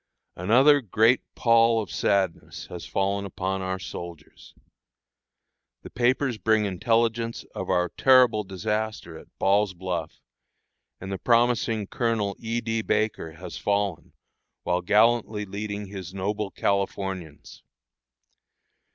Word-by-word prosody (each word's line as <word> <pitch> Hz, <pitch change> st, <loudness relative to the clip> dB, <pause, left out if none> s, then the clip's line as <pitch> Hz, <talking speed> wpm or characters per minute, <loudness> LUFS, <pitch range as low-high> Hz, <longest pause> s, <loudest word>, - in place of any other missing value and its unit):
Another 130 Hz, -, +5 dB
great 115 Hz, +3 st, +3 dB
pall 115 Hz, -1 st, +4 dB
of 105 Hz, -, -5 dB
sadness 95 Hz, -4 st, -1 dB
has 90 Hz, -1 st, -7 dB
fallen 100 Hz, +1 st, -1 dB
upon 95 Hz, 0 st, -3 dB
our 95 Hz, 0 st, -2 dB
soldiers. 85 Hz, -4 st, -10 dB, 1.3 s
The -, -, -10 dB
papers 125 Hz, 0 st, +1 dB
bring 110 Hz, +2 st, +2 dB
intelligence 115 Hz, +3 st, 0 dB
of 95 Hz, -, -5 dB
our 90 Hz, -1 st, +2 dB
terrible 125 Hz, -3 st, +4 dB
disaster 100 Hz, -1 st, -3 dB
at -, -, -12 dB
Ball's 100 Hz, 0 st, +2 dB
Bluff, 85 Hz, -3 st, -4 dB, 0.8 s
and 95 Hz, +1 st, -7 dB
the 95 Hz, -, -4 dB
promising 115 Hz, -2 st, +2 dB
Colonel 110 Hz, -2 st, -1 dB
E. 115 Hz, +1 st, -2 dB
D. 115 Hz, 0 st, -1 dB
Baker 110 Hz, -7 st, -1 dB
has 90 Hz, +2 st, -8 dB
fallen, 100 Hz, -4 st, -1 dB, 0.5 s
while 90 Hz, +1 st, 0 dB
gallantly 105 Hz, +2 st, +2 dB
leading 105 Hz, +1 st, -5 dB
his 95 Hz, -2 st, -8 dB
noble 105 Hz, +2 st, -2 dB
Californians. 95 Hz, -6 st, -3 dB
100 Hz, 115 wpm, -25 LUFS, 95-115 Hz, 1.3 s, Another